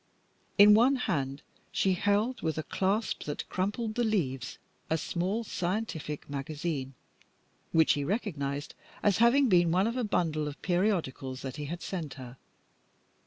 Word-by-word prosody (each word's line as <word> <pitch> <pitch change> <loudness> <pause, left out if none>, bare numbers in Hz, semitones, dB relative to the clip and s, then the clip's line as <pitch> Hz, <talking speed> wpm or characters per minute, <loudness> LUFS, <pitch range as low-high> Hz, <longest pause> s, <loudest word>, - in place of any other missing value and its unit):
In 205 0 +9
one 245 +6 +5
hand 140 - -2 0.3
she 190 - +2
held, 205 +6 +1
with 160 -2 -1
a 155 - -1
clasp 195 +5 -1
that 145 - -4
crumpled 210 +4 -1
the 240 - 0
leaves, 135 - -1 0.3
a 160 - +2
small 185 +8 -1
scientific 175 -7 -3
magazine, 145 -1 -4 0.8
which 160 -1 +5
he 145 - -1
recognized 145 - -2 0.3
as 205 -1 +3
having 250 +4 +5
been 175 -5 +4
one 185 +3 +3
of 235 +3 -1
a 250 - 0
bundle 160 -7 0
of 145 0 -7
periodicals 175 -9 0
that 135 +1 -5
he 150 - -4
had 170 +4 -5
sent 160 -9 -4
her. 125 -2 -10
175 Hz, 150 wpm, -30 LUFS, 145-210 Hz, 0.8 s, In